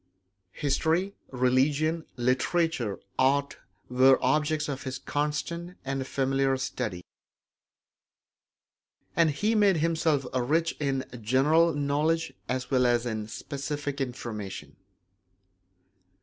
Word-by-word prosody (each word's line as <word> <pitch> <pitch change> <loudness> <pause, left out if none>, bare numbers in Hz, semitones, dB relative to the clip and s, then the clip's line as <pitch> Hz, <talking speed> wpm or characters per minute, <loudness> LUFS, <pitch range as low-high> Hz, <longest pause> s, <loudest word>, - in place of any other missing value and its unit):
History, 160 +7 0 0.2
religion, 140 +6 +1
literature, 125 - 0 0.2
art 140 +2 +2 0.3
were 130 +1 +5
objects 150 0 +1
of 140 -2 -4
his 130 -1 -4
constant 150 +6 -3
and 135 -1 -2
familiar 135 0 +1
study; 120 -9 -4 2.1
and 165 -2 +4
he 205 +10 0
made 205 -4 +4
himself 160 -3 +1
rich 150 +7 +1
in 135 -2 -1 0.2
general 145 +8 +3
knowledge 150 +3 0 0.2
as 125 0 -2
well 125 -2 +4
as 120 0 +2
in 110 -3 -3
specific 145 +3 -4
information. 115 -6 -5
140 Hz, 95 wpm, -28 LUFS, 130-160 Hz, 2.1 s, were